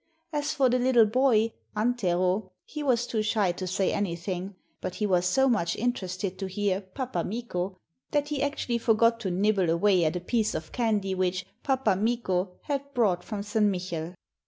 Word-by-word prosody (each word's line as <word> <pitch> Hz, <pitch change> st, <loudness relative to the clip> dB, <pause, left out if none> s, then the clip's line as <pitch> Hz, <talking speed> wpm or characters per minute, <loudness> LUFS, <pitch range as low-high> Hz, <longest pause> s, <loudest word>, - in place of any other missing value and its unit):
As 295 Hz, 0 st, 0 dB
for 275 Hz, -3 st, +3 dB
the 250 Hz, 0 st, +2 dB
little 245 Hz, -2 st, +5 dB
boy, 230 Hz, -1 st, +3 dB, 0.3 s
Antero, 190 Hz, -4 st, +1 dB
he 300 Hz, -, -6 dB
was 245 Hz, -4 st, +2 dB
too 225 Hz, -3 st, -1 dB
shy 210 Hz, -3 st, +1 dB
to 185 Hz, +1 st, -5 dB
say 185 Hz, +1 st, 0 dB
anything; 185 Hz, 0 st, -3 dB, 0.3 s
but 185 Hz, -, -4 dB
he 210 Hz, -, -1 dB
was 180 Hz, -3 st, +2 dB
so 265 Hz, +9 st, +3 dB
much 170 Hz, -9 st, +1 dB
interested 190 Hz, -5 st, -2 dB
to 195 Hz, -, -2 dB
hear 195 Hz, 0 st, -1 dB
'Pappa 190 Hz, -1 st, -4 dB
Mikko' 190 Hz, -4 st, -3 dB, 0.3 s
that 290 Hz, 0 st, 0 dB
he 295 Hz, -3 st, -2 dB
actually 280 Hz, -4 st, -1 dB
forgot 230 Hz, 0 st, +3 dB
to 195 Hz, -, -2 dB
nibble 190 Hz, 0 st, +2 dB
away 180 Hz, +2 st, +3 dB
at 160 Hz, +2 st, +1 dB
a -, -, -1 dB
piece 215 Hz, +4 st, 0 dB
of 155 Hz, 0 st, -5 dB
candy 210 Hz, -5 st, 0 dB
which 185 Hz, 0 st, -1 dB, 0.2 s
'Pappa 265 Hz, -7 st, +2 dB
Mikko' 200 Hz, -3 st, 0 dB
had 280 Hz, -1 st, -3 dB
brought 190 Hz, -7 st, +2 dB
from 210 Hz, -3 st, -4 dB
St. 210 Hz, +1 st, 0 dB
Michel. 180 Hz, -3 st, -3 dB
205 Hz, 180 wpm, -27 LUFS, 185-240 Hz, 0.3 s, little